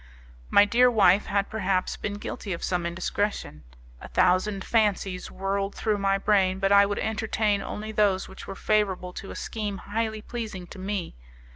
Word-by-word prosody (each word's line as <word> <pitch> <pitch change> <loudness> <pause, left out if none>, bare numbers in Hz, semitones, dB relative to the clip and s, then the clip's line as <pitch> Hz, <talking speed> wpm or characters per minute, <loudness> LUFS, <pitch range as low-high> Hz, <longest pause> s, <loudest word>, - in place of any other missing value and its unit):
My 205 - +6
dear 245 +4 +5
wife 205 -4 +4
had, 200 0 0
perhaps, 190 -4 -1
been 205 -1 -4
guilty 205 -1 -5
of 170 - -6
some 175 -2 0
indiscretion. 170 - -3 0.4
A - - -8
thousand 190 +2 +2
fancies 200 -4 0
whirled 195 +1 -2
through 210 -2 0
my 195 0 +2
brain, 195 -2 +2
but 195 0 +1
I 200 0 +7
would 205 - -2
entertain 220 -2 0
only 215 +2 -5
those 205 -3 +2
which 190 - -11
were 195 - -6
favourable 190 -4 0
to 195 - -8
a - - -7
scheme 210 -3 -4
highly 220 +1 -3
pleasing 220 -6 -6
to 190 - -11
me. 190 - -4
200 Hz, 170 wpm, -26 LUFS, 190-210 Hz, 0.4 s, I